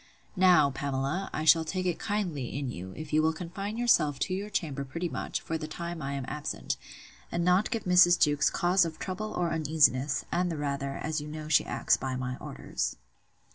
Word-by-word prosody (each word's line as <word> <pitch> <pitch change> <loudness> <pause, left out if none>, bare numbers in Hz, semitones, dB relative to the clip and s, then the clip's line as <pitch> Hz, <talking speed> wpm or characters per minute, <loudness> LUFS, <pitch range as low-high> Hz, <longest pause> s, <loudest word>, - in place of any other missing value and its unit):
Now, 180 -6 +5
Pamela, 140 +6 -2
I 155 - -3
shall 160 +1 +6
take 185 +3 -3
it 175 -2 -1
kindly 175 - -2
in 140 -3 -3
you, 95 -2 -7
if 155 -1 -7
you 155 - +5
will 160 +1 +2
confine 195 +6 -5
yourself 170 - +3
to 185 - 0
your 200 +3 -3
chamber 145 -8 -2
pretty 165 +6 -4
much, - - -3
for 160 0 -3
the 155 - -5
time 170 +1 -5
I 140 0 -3
am 135 -2 -3
absent, 150 0 -3 0.6
and 170 0 -1
not 180 +3 +3
give 230 -4 -2
Mrs. 180 -1 +6
Jewkes 145 0 +3
cause 180 +1 +3
of 165 -2 -4
trouble 210 +3 -4
or 175 -1 0
uneasiness; 150 -3 +2
and 180 0 +1
the 160 - -3
rather, 140 -1 -2
as 155 0 -2
you 150 - -7
know 155 0 -6
she - - +4
acts - - +2
by 130 -1 -3
my 125 0 -3
orders. 65 0 -4
155 Hz, 205 wpm, -29 LUFS, 140-180 Hz, 0.6 s, shall